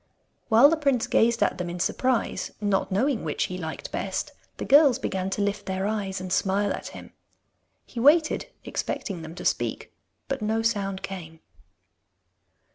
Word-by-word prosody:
While 230 +4 +8
the 325 - +2
prince 275 -6 +1
gazed 230 +1 +3
at - - 0
them 175 -1 -3
in 175 +1 -5
surprise, 255 +7 0
not 205 -1 0
knowing 235 +4 +1
which 155 -2 -1
he 180 - -4
liked 160 -2 -6
best, - - -3 0.3
the - - -4
girls 280 -3 +6
began 190 -7 -2
to 200 +1 -1
lift 205 +1 -2
their 190 0 -2
eyes 200 -3 -2
and 185 -1 -4
smile 200 +1 +1
at - - -6
him. - - -11 0.7
He 240 - -7
waited, 310 - +4 0.2
expecting 190 -6 -4
them 160 +1 -9
to 180 - -8
speak, - - -1 0.3
but 270 -2 -3
no 220 +1 0
sound 195 -4 -1
came. 170 -5 -7
205 Hz, 165 wpm, -26 LUFS, 190-235 Hz, 0.7 s, While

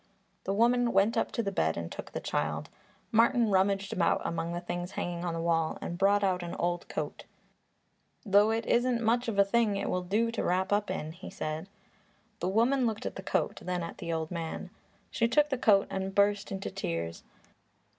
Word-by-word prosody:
The 195 - 0
woman 240 +2 +3
went 200 +4 +3
up 225 - 0
to 230 - 0
the 200 - -1
bed 80 - 0
and 85 0 -5
took - - -7
the - - -3
child. - - -2 0.4
Martin 230 0 +4
rummaged 195 +1 +2
about 180 - +2
among 170 0 -2
the 175 - -2
things 175 +1 -5
hanging 175 -1 -3
on 170 -2 -2
the - - -3
wall 165 -1 +1
and 170 - -4
brought 200 +3 +3
out 185 -2 +1
an 170 -1 -5
old 175 0 -2
coat. - - -4 1.0
"Though 205 +1 +5
it 225 0 0
isn't 240 -1 +2
much 235 +2 +2
of 220 -3 -2
a 200 - +6
thing, 220 0 +2
it 200 - -2
will 180 - 0
do 215 +6 0
to 230 - -2
wrap 185 +3 +1
up 205 -1 +1
in," 160 -4 -3
he 170 +3 -10
said. 155 +4 -4 0.7
The 180 - -1
woman 240 +5 +3
looked 220 -1 -3
at - - -4
the - - -6
coat; - - -1
then 180 -1 -2
at 165 - -7
the 170 - -4
old 160 0 -2
man. 170 +2 -5 0.4
She 230 - +2
took 295 +5 +3
the 265 - 0
coat 200 -4 +5
and 190 0 -3
burst 205 0 +2
into 195 0 -4
tears. 85 0 -4
195 Hz, 205 wpm, -30 LUFS, 175-225 Hz, 1.0 s, a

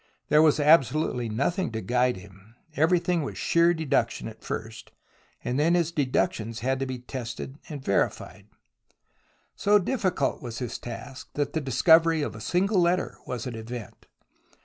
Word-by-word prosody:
There 150 - +6
was 155 -1 +4
absolutely 145 -4 +3
nothing 140 - -1
to 110 - -2
guide 125 0 +1
him. 95 +3 -15 0.2
Everything 170 +2 +2
was 140 - -5
sheer 170 +1 +3
deduction 135 -10 0
at 110 0 -11
first, 110 0 -6 0.5
and 125 +3 -1
then 165 +4 +3
his 170 -2 +1
deductions 115 -6 -1
had 130 +2 0
to 135 - -2
be 130 -1 -4
tested 125 +2 -7
and 145 -4 -7
verified. 100 0 -1 1.1
So 205 +1 +4
difficult 190 - -1
was 120 -2 -6
his 125 -2 -4
task 120 +1 -8
that 145 -1 -1
the 160 - -1
discovery 160 +4 +4
of - - -3
a 110 - -9
single 185 - +1
letter 175 +1 0
was 120 -3 -4
an 125 - -4
event. 115 0 -8
135 Hz, 155 wpm, -26 LUFS, 120-165 Hz, 1.1 s, There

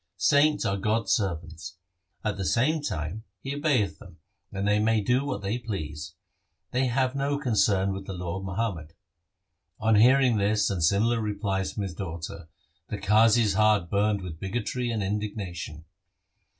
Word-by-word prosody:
Saints 145 - +3
are 100 - 0
God's 105 +1 0
servants. 85 -2 -2 0.5
At 105 -2 -1
the 100 - -4
same 130 - +2
time, 90 - -4 0.2
He 135 - -5
obeyeth 145 - +1
them, - - -14 0.3
and 100 +1 -2
they 105 0 +3
may 110 +1 +3
do 125 +6 +1
what 130 -8 -4
they 105 +5 -1
please. 80 -8 -6 0.6
They 130 +1 +1
have 130 +1 +1
no 140 +1 0
concern 100 -7 +2
with 95 0 -7
the 95 - -4
law 90 0 -4
of - - -8
Muhammad.' 95 -6 -3 0.9
On 110 0 +2
hearing 125 +2 +5
this 105 0 +2
and 90 -5 -1
similar 110 +7 +2
replies 100 -2 -2
from 105 - -3
his 95 -3 -4
daughter, 85 0 -6 0.4
the 105 - -4
Qazi's 105 +1 +4
heart 105 -4 +3
burned 100 -1 +1
with 80 -3 -7
bigotry 120 +5 -2
and 110 -3 -1
indignation. 95 -6 -4
105 Hz, 160 wpm, -27 LUFS, 95-115 Hz, 0.9 s, hearing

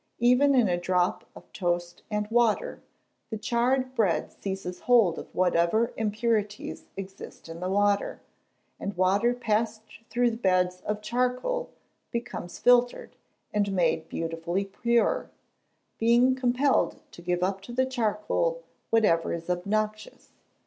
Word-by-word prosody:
Even 250 +4 +4
in 245 -4 +4
a 175 -1 0
drop 180 0 0
of - - -15
toast 175 -2 -2
and 210 -1 -1
water, 235 -2 +1 0.5
the 220 - -3
charred 250 +4 0
bread 205 -9 +1
seizes 190 -2 -5
hold 225 -9 +3
of - - -8
whatever 185 +6 +2
impurities 215 -1 -2
exist 195 -2 -9
in 165 0 -8
the 180 +1 -3
water; 205 +1 +1 0.6
and 200 -2 -5
water 195 +6 +3
passed 220 -2 -1 0.3
through 240 -1 +1
beds 185 -3 +1
of 210 0 -2
charcoal, 250 - -1 0.4
becomes 235 -7 -5
filtered, 245 0 +3 0.4
and 205 -1 +1
made 165 -3 +1
beautifully 165 +3 -2
pure, 235 - +1 0.7
being 240 +3 +4
compelled 255 +2 +1
to - - -12
give 175 +1 -1
up 195 +1 -1
to 215 - -10
the 260 +2 +1
charcoal 260 - -1 0.3
whatever 205 -8 +3
is 170 +1 -3
obnoxious. 215 +4 -3
210 Hz, 130 wpm, -27 LUFS, 185-240 Hz, 0.7 s, Even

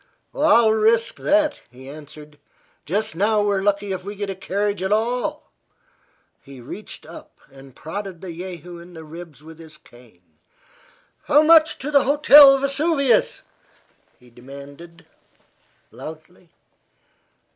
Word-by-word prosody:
"I'll 235 -7 +4
risk 225 +1 +1
that," 305 -1 0
he 130 +2 -15
answered. 150 +1 -13 0.5
"Just 210 +6 -2
now 210 +3 +1
we're 200 -2 0
lucky 200 0 -1
if 185 -1 -5
we 200 +2 -7
get 200 -1 -4
a - - -7
carriage 200 +1 -3
at 190 +1 -2
all." 235 +4 -2 0.9
He 135 -1 -14
reached 120 - -11
up - - -14
and 135 -1 -16
prodded 190 +2 -7
the 180 -2 -9
jehu 175 -1 -9
in 175 +1 -14
the 160 - -10
ribs 160 -2 -12
with 160 +1 -14
his 160 -2 -14
cane. 120 -11 -22 0.9
"How 295 +1 +4
much 320 0 +5
to 285 +3 -6
the 280 -2 +4
Hotel 285 0 +7
Vesuvius?" 275 -2 0 0.8
he 125 -1 -21
demanded, 140 +7 -13 0.9
loudly. 160 +3 -12
190 Hz, 130 wpm, -21 LUFS, 155-230 Hz, 0.9 s, Hotel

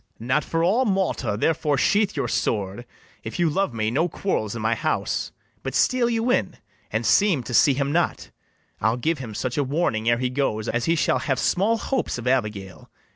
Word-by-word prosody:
BARABAS. 115 - -10
Not 130 +4 +2
for 165 0 -1
all 220 +9 +3
Malta; 190 - 0
therefore 150 -1 +1
sheathe 205 +8 +2
your - - -1
sword; 105 +2 -2 0.4
If - - -6
you 170 -3 +2
love 195 -1 0
me, 110 -1 -1
no 160 +8 +1
quarrels 115 - -2
in 115 - -5
my 110 +1 +2
house; 115 - -2 0.3
But - - -5
steal 250 -2 +3
you 230 +1 0
in, - - 0 0.3
and - - -2
seem 190 -11 +3
to 125 - -7
see 135 +3 +5
him 140 +1 -1
not: 170 +3 -1 0.5
I'll 110 +3 +1
give 155 +4 -1
him 115 -5 -7
such 130 +5 -2
a - - +3
warning 130 -6 0
ere 120 - +3
he 125 0 -1
goes, 115 -5 -1
As 120 0 -1
he 165 - +2
shall 155 - +1
have 135 -2 -1
small 215 +5 +1
hopes 260 - -2
of 120 - -7
Abigail. 105 -7 -2
140 Hz, 205 wpm, -24 LUFS, 115-175 Hz, 0.5 s, see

